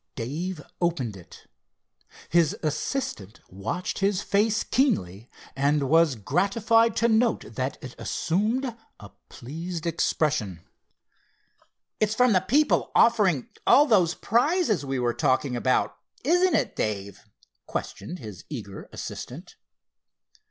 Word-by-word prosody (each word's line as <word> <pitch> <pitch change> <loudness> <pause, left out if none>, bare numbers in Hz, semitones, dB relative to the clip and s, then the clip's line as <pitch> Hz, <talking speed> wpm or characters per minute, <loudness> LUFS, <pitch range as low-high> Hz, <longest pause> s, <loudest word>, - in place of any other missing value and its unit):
Dave 155 +7 -4 0.2
opened 160 - 0
it. 90 -3 -14 0.8
His 170 -3 +3
assistant 150 - -3
watched 110 - -4
his 200 0 +1
face 210 +2 +1
keenly, 120 - 0 0.3
and 140 +2 +2
was 165 -4 +5
gratified 205 - +2
to 230 - +2
note 225 - +1
that 130 +3 -3
it 130 -1 -7
assumed 225 +8 -1 0.2
a 100 - -11 0.2
pleased 165 +6 -6
expression. 145 - 0 1.4
"It's 215 0 +1
from 250 -1 +4
the 185 - +4
people 290 +10 +2
offering 195 - +3 0.2
all 290 - +7
those 185 - +3
prizes 240 - +1
we 135 -1 -2
were 120 -1 0
talking 130 -2 +1
about; 125 +1 +1 0.3
isn't 355 +6 +3
it, - - 0
Dave?" 100 -2 -3 0.4
questioned 175 - -5
his 105 - -10
eager - - -7
assistant. - - -8
170 Hz, 115 wpm, -26 LUFS, -, 1.4 s, all